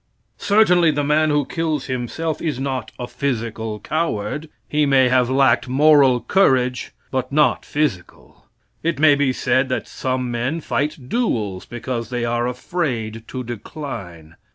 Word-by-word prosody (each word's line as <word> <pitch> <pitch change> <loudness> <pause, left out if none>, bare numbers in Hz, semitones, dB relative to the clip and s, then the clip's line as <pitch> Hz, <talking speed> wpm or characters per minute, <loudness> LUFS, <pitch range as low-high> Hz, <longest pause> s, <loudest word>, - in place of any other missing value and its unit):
Certainly 190 -5 +4
the 145 -1 0
man 155 +2 +2
who 145 -2 +2
kills 155 -3 -2
himself 130 +5 -3
is 150 -6 -2
not 135 -1 -3
a 125 - -4
physical 115 -5 -3
coward. 150 -1 -2 0.2
He 150 -1 +1
may 130 -2 +4
have 125 -1 +3
lacked 130 -2 +3
moral 135 -2 +5
courage, 125 - +2 0.2
but 130 -1 -2
not 150 +1 +3
physical. 145 - -4 0.3
It 170 +1 -1
may 150 0 +6
be 140 -2 +2
said 130 +1 +1
that 130 - -2
some 130 -1 -2
men 125 +7 -1
fight 145 -3 -3
duels 110 - -1
because 120 -1 -4
they 120 -1 -2
are 120 +1 0
afraid 125 -5 -3
to 130 -1 -5
decline. 100 - -8
130 Hz, 145 wpm, -21 LUFS, 120-150 Hz, 0.3 s, may